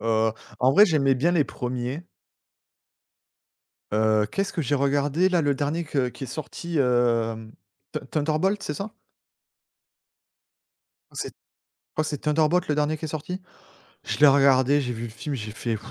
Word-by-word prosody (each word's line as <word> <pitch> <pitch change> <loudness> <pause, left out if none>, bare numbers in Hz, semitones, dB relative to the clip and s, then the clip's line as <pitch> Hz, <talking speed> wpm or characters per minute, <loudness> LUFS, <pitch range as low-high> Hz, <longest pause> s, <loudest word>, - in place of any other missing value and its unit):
Heu, 110 -1 +2 0.3
en 130 +1 +4
vrai, 205 +9 +8
j'aimais 140 -6 +3
bien 165 +7 +2
les 155 -4 +3
1ers. 125 +5 -4 1.9
Heu, 110 0 +3
qu'est-ce 195 0 -1
que 165 - -1
j'ai 145 -1 -1
regardé 145 +5 +2
là, 180 -2 +2
le 145 -2 +2
dernier 145 +5 -1
que 140 -5 -1
qui 135 - -9
est - - -5
sorti, 160 +5 -5
hem, 115 -3 +1 0.4
te - - -3
Thunder 155 +2 -1
Bolt 195 +4 0
c'est 150 - -3
ça? 200 +7 -6 2.2
Ah - - -24
c'est - - -4 0.5
je - - -5
crois - - 0
c'est 150 -2 -3
Thunder 150 +2 +2
Bolt 180 +3 +1
le 150 - +1
dernier 150 +1 +1
qui 160 - -5
est - - -3
sorti? 160 +5 -5 0.6
Je - - -3
l'ai 150 - +7
regardé, 135 0 +5
j'ai 125 -3 -2
vu 115 -1 -6
le - - -4
film, 130 +6 -5
j'ai 110 -4 -5
fait: 115 +1 -3
140 Hz, 175 wpm, -25 LUFS, 125-155 Hz, 2.2 s, vrai